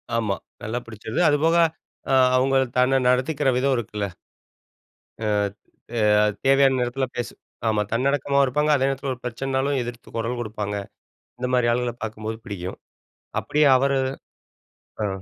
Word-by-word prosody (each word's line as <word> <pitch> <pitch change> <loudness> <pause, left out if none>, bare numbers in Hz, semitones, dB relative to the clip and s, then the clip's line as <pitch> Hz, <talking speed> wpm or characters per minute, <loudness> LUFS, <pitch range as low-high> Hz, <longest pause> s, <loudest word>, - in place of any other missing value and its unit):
ஆமா, 105 -4 0 0.3
நல்லா 115 +3 -2
பிடிச்சிது. 110 +2 -5
அதுபோக 160 +3 +3 0.6
அ - - +3 0.2
அவங்க 135 +1 +3 0.2
தன்னை 125 +1 +4
நடத்திக்கிற 130 +2 +2
விதம் 135 +1 +2
இருக்குல்ல. 105 -3 -3 1.2
அ, - - 0 0.7
அ 105 0 +4 0.2
தேவையான 135 -1 +5
நேரத்தில 125 +2 -1
பேசு 120 -1 -3 0.4
ஆமா 105 -1 +2
தன்னடக்கமாவும் 140 +2 +2
இருப்பாங்க 150 +4 +1
அதே 135 -1 +2
நேரத்தில 135 0 -2
ஒரு 125 - -9
பிரச்சனைனாலும் 135 +3 -1
எதிர்த்து 120 0 -8
கொரல் 115 +2 -2
குடுப்பாங்க. 105 -2 -4 0.7
இந்த 125 - -1
மாரி 125 -1 +3
ஆள்கள 120 -1 -1
பார்க்கும்போது 110 0 -4
பிடிக்கும். 90 -3 -6 0.6
அப்டியே 150 -1 +3
அவரு 140 +1 +2 1.1
அ. - - +1
125 Hz, 130 wpm, -24 LUFS, 110-135 Hz, 1.2 s, தேவையான